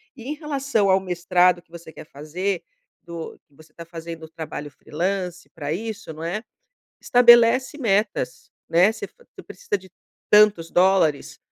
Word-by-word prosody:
E 235 - -12
em 285 - -3
relação 280 -9 -1
ao 190 0 +4
mestrado 180 -1 +2
que 165 - -38
você 170 -1 -11
quer - - -11
fazer, 170 +6 -4 0.4
do 170 -1 -8
que 145 - -33
você 155 +1 -19
está 170 - -10
fazendo 165 -1 -9
o - - -15
trabalho 155 -2 -7
freelancer 180 +4 -4
pra 150 -3 -5
isso, 220 -2 -6
não 155 +1 -9
é? 200 +7 -3 0.6
Estabelece 245 +3 +5
metas, 220 - -1 0.2
né, 175 +5 +4
você - - -7 0.3
tu - - -11
precisa - - -4
de 190 0 -17 0.4
tantos 210 -6 +5
dólares, 180 -5 +2
180 Hz, 155 wpm, -23 LUFS, 165-215 Hz, 0.6 s, Estabelece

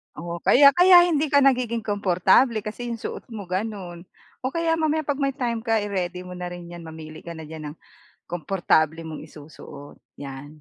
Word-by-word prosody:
Oo, 170 0 -6
kaya 280 - +7
kaya 355 +3 +7
hindi 310 -3 +1
ka 285 -1 +4
nagiging 245 -4 +2
komportable 205 +3 +2
kasi 240 +3 -6
yung 230 -1 -4
suot - - -6
mo 205 -2 -6
gano'n. 185 -3 -4 0.4
O 260 - -2
kaya 330 -1 +1
mamaya 315 0 +1
'pag 285 0 -2
may 275 -1 0
time 235 -3 -2
ka, 225 -2 0
i-ready 180 -3 -3
mo 180 - -10
na 180 0 -5
rin 175 -1 -9
'yan, 170 -1 -10
mamili 160 -1 -10
ka 170 -1 -9
na 160 - -8
diyan 155 -1 -8
ng - - -23 0.5
komportable 165 -2 0
mong 155 -1 -7
isusuot, 150 -2 -12 0.2
yan. 135 0 -8
195 Hz, 185 wpm, -24 LUFS, 165-255 Hz, 0.5 s, kaya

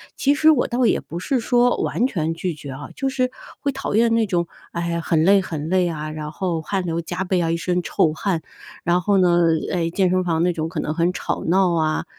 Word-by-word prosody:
其 285 +1 +2
实 315 +1 +4
我 290 -6 +3
倒 245 +1 +1
也 - - +2
不 170 +2 -7
是 255 +7 0
说 245 +1 +3
完 250 - +1
全 165 -8 -2
拒 170 +1 -3
绝 145 -2 -9
啊， 140 +2 -8
就 270 -1 -1
是 255 -1 0 0.3
会 280 - -1
讨 270 -5 -3
厌 230 0 +4
那 225 -1 +3
种， 175 -3 -1 0.2
哎， 170 0 -2
很 160 0 +1
累 195 0 +5
很 155 -4 -5
累 185 -1 +2
啊， 155 -1 -4
然 155 -1 -6
后 170 -1 -2
汗 190 +3 -2
流 170 0 -1
浃 180 +3 -4
背 180 -2 +1
啊， 165 0 0
一 170 - 0
身 180 +2 -1
臭 155 -1 +1
汗， 180 -1 -1 0.4
然 175 +1 +2
后 200 +2 +2
呢， 175 -2 +4 0.3
哎， 170 -2 0
健 185 +1 +1
身 185 0 +1
房 165 -2 0
那 180 0 +2
种 160 -1 -3
可 165 -2 -4
能 155 - -2
很 170 +2 +1
吵 - - -3
闹 180 0 +3
啊， 155 -1 0
175 Hz, 255 characters per minute, -22 LUFS, 165-200 Hz, 0.4 s, 累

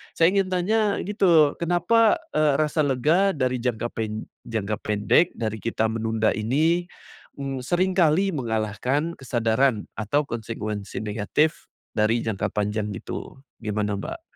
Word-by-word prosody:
saya 165 +2 +4
ingin 195 -1 +2
tanya 205 +3 +1
gitu, 175 -7 +4
kenapa, 215 - +3 0.2
eee, 150 -2 +3
rasa 155 0 +1
lega 155 +10 +3
dari 130 -2 0
jangka 120 -1 -1
pen 110 -1 -3 0.2
jangka 110 -2 -2
pendek, 105 - +2
dari 110 -1 -2
kita 110 -1 0
menunda 110 -1 0
ini, 155 +11 +1 0.5
m 135 -1 -4
seringkali 180 +2 +2
mengalahkan 125 +6 -1
kesadaran 120 -1 +1
atau 125 +8 +1
konsekuensi 110 -3 -5
negatif, 110 +9 0 0.3
dari 110 +2 +2
jangka 110 -3 -1
panjang 105 0 -1
gitu, 135 - -7 0.2
gimana 105 -1 -1
Mbak? 330 - -6
125 Hz, 125 wpm, -24 LUFS, 110-165 Hz, 0.5 s, saya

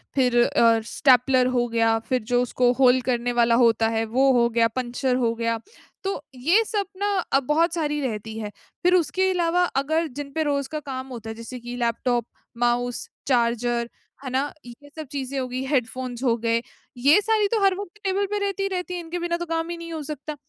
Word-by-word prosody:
फिर 250 -3 +2
अ, 230 -1 +4
स्टेपलर 255 +1 +4
हो 240 -1 +1
गया, 225 -1 +2
फिर 255 -1 +1
जो 245 - +4
उसको 245 0 +2
होल 255 -1 +6
करने 245 -1 -1
वाला 235 -1 +3
होता 225 -1 +3
है, 225 0 0
वो 265 +4 +3
हो 235 - +4
गया, 230 0 +3
पंक्चर 250 +2 -2
हो 230 -1 +2
गया, 230 0 -1 0.4
तो 390 -6 -2 0.2
ये 345 - +3
सब 410 -2 -1
ना 405 +1 0 0.2
अ, 270 - +5
बहुत 315 +5 +1
सारी 295 -3 -1
रहती 220 -3 -4
है। 210 -1 -5 0.3
फिर 360 +1 +4
उसके 375 +2 +2
अलावा 355 0 +2 0.2
अगर 320 +3 0
जिन 280 -1 -6
पे 320 - +1
रोज़ 280 -2 -1
का 305 - -2
काम 260 0 -5
होता 230 -4 -8
है, 220 - -5
जैसे 230 +2 -8
कि 240 +1 -7
लैपटॉप, 235 0 0 0.3
माउस, 240 0 0 0.2
चार्जर, 240 -1 +1 0.3
है 260 - -4
ना? 275 +3 0
ये 245 +5 -13
सब 315 -2 -7
चीज़ें 275 -1 -3
हो 255 - -2
गई, 255 +1 -4
हेडफोन्स 255 -1 -2
हो 235 -3 +3
गए, 230 0 +2 0.4
ये 280 +10 +5
सारी 430 -1 +2
तो 430 0 0
हर 390 -1 +4
वक़्त 405 0 -8
टेबल 390 +1 +1
पे - - 0
रहती 395 0 -2
ही 390 - 0
रहती 360 -1 -3
हैं, 350 -1 -4
इनके 335 +2 -5
बिना 340 0 -1
तो 345 - -4
काम 330 0 -2
ही 345 - -4
नहीं 335 0 -8
हो 315 - -4
सकता। 300 0 -6
260 Hz, 215 wpm, -24 LUFS, 240-330 Hz, 0.4 s, होल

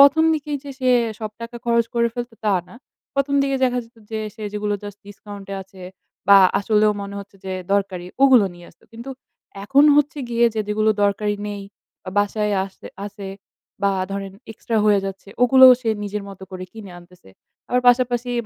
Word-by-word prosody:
প্রথম 320 0 +3
দিকেই 295 -1 -3
যে 285 - -7
সে 255 -1 +1 0.3
সব 215 -1 -5
টাকা 230 +1 -7
খরচ 235 -1 +2
করে 235 0 +3
ফেলতো, 240 0 -5
তা 210 - +3
না। - - -14 0.4
প্রথম 275 0 +1
দিকে 275 0 0
দেখা 250 -1 +2
যেত 230 - -25 0.2
যে 220 - -2 0.2
সে 220 - -8
যেগুলো 210 0 -1
জাস্ট 205 -1 -8
ডিসকাউন্টে 205 -1 -9
আছে 190 0 -15 0.5
বা, 200 0 +9 0.2
আসলেও 210 +1 +3
মনে 200 0 -7
হচ্ছে 200 0 -12
যে 190 - -3 0.2
দরকারি, 195 -3 -1 0.2
ওগুলো 255 -6 +6
নিয়ে 175 0 -14
আসতো। - - -26
কিন্তু 235 +3 -9 0.5
এখন 275 +8 +4
হচ্ছে 295 +1 +2
গিয়ে 235 0 +3
যে, 220 - -2
যেগুলো 215 +1 +1
দরকারি 205 +1 +1
নেই 205 -1 -5 0.4
বা, 185 - -6
বাসায় 210 +1 +1
আসে 195 - -12 0.2
আছে 200 -1 -8 0.6
বা, 200 - +3 0.2
ধরেন 195 -1 -5 0.2
এক্সট্রা 225 0 -3
হয়ে 205 -1 +4
যাচ্ছে 195 0 -7
ওগুলোও 260 +1 +8
সে 230 - -1
নিজের 205 0 -4
মতো 195 -1 -11
করে 185 -1 -6
কিনে 215 -4 -10
আনতেছে। 175 - -18 0.4
আবার 250 0 +2
পাশাপাশি 245 0 +3
210 Hz, 180 wpm, -21 LUFS, 200-245 Hz, 0.6 s, বা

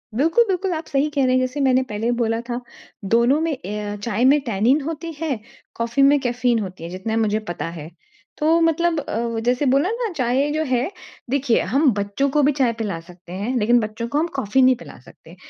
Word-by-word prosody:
बिल्कुल, 325 - +4
बिल्कुल 380 0 -1
आप 315 0 -4
सही 285 +1 +1
कह 285 -3 0
रहे 255 - +2
हैं 255 - +4
जैसे 255 +3 -2
मैंने 260 0 +3
पहले 215 +3 -2
बोला 225 0 0
था 240 +1 -2 0.5
दोनों 240 +5 +4
में 325 0 0
ए 210 -7 -5
अ, 205 0 -4
चाय 215 +3 -1
में 285 +3 +6
टैनिन 230 +9 +2
होती 325 +3 -5
है, 285 -8 -1 0.4
कॉफ़ी 230 +4 -1
में 285 +1 +5
कैफीन 245 -2 0
होती 185 -4 -6
है, 170 - -6
जितना 190 +5 -3
मुझे 215 -1 +1
पता 165 - -4
है। 150 +1 -8 0.5
तो 320 +2 +3
मतलब 330 0 +2
अ, 230 -3 -3
जैसे 250 +4 +1
बोला 275 +7 +3
ना 465 -3 -2
चाय 260 +3 +1
जो 310 +1 0
है 255 +2 0 0.4
देखिए 265 -3 +2
हम 280 +2 +4
बच्चों 205 +7 -1
को 295 +2 +2
भी 285 - +4
चाय 245 -3 +3
पिला 210 -7 -4
सकते 175 +1 -15
हैं, 210 +7 -3
लेकिन 235 +2 +4
बच्चों 220 +1 -4
को 285 - -2
हम 330 - +1
कॉफ़ी 265 0 +1
नहीं 255 0 +5
पिला 245 - -12
सकते। - - -16
255 Hz, 215 wpm, -21 LUFS, 220-290 Hz, 0.5 s, में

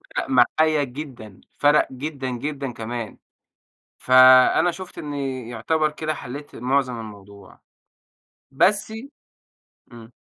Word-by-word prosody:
فَرَق - - -2
معايا 150 +4 +3
جدًا 125 -7 -9 0.2
فَرَق 145 +1 +4
جدًا، 135 0 -5
جدًا 135 +1 -4
كمان. 115 0 -6 0.8
فأنا 130 +6 +6
شُفت 185 +1 -10
إنّي 135 -5 -5
يُعتبر 155 +7 -1
كده 155 +1 -4
حلّيت 145 +2 -9
معظم 125 -1 -1
الموضوع. 100 -2 -13 0.9
بس 205 +9 +1 1.0
إمم. 115 0 -13
130 Hz, 100 wpm, -22 LUFS, 120-150 Hz, 1.0 s, فأنا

